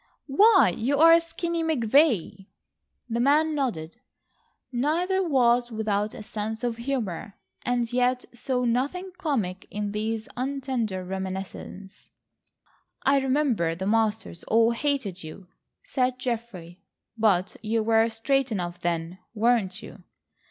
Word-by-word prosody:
"Why, 375 - +5
you 270 +5 0
are 330 +2 +7
Skinny 335 0 -3
McVay." 235 - +2 0.6
The 235 0 -2
man 300 +5 +3
nodded. 225 - -3 0.7
Neither 330 +9 +1
was 245 -7 +2
without 215 -1 -1
a - - -8
sense 220 +2 -5
of 235 -2 -1
humour, 235 -7 -3 0.3
and 245 -1 -1
yet 250 0 +1
saw 250 +1 -1
nothing 285 +11 -1
comic 215 - -2
in 205 -1 -3
these 220 +1 -3
untender 255 -7 -2
reminiscences. 190 +1 -7 0.9
"I 275 0 +4
remember 260 - +1
the 190 +3 -5
masters 220 -4 0
all 230 +1 +4
hated 235 - -2
you," 175 +4 -10 0.3
said 255 - 0
Geoffrey, 220 -8 -5 0.3
"but 200 -4 +2
you 220 0 0
were 225 +1 +3
straight 265 +3 0
enough 175 -4 -3
then, 170 +1 -3 0.2
weren't 225 -3 +1
you?" - - -12
230 Hz, 120 wpm, -26 LUFS, 200-270 Hz, 0.9 s, are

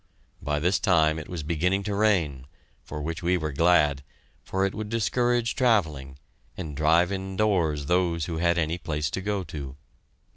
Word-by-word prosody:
By 75 +1 -1
this 90 +5 +1
time 80 -6 +3
it 75 - -9
was 85 -4 -5
beginning 90 +5 0
to 105 - -3
rain, 85 -11 +1 0.3
for 75 -1 -7
which 80 +2 -4
we 90 +1 +2
were 75 -2 -3
glad, 75 -2 +3 0.4
for 95 +1 0
it 95 - -2
would 110 -1 -5
discourage 120 +2 +1
travelling 80 - +1 0.4
and 80 -6 -6
drive 80 +5 +3
indoors 95 -6 0
those 85 -1 +1
who 80 -1 -4
had 85 0 +2
any 85 +1 -1
place 75 -4 -2
to 95 - -3
go 100 0 -2
to. 70 -5 -7
85 Hz, 170 wpm, -26 LUFS, 75-95 Hz, 0.4 s, time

